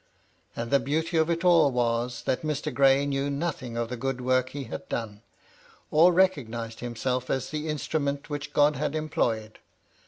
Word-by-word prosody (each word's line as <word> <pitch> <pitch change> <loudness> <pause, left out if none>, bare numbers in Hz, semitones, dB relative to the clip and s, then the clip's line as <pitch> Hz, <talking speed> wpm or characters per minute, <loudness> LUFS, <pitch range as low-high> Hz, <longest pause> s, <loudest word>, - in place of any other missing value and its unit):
And 115 0 -4
the 140 - +5
beauty 160 +5 -1
of 160 +1 +3
it 170 +1 -1
all 165 -5 +6
was, 120 0 -1
that 130 - 0
Mr. 150 -1 -2
Gray 135 0 +4
knew 140 0 -1
nothing 140 -5 -3
of 115 -1 -2
the 125 - -3
good 135 +1 -2
work 130 0 +1
he 140 +1 -6
had 115 - -8
done, 105 -3 -4 0.7
or 165 +4 +6
recognised 120 -12 0
himself 125 +1 -2
as 130 - -2
the 155 0 -3
instrument 145 -1 -2
which 145 0 -5
God 145 0 +3
had 150 +2 -2
employed. 115 -8 -1
140 Hz, 175 wpm, -27 LUFS, 120-150 Hz, 0.7 s, all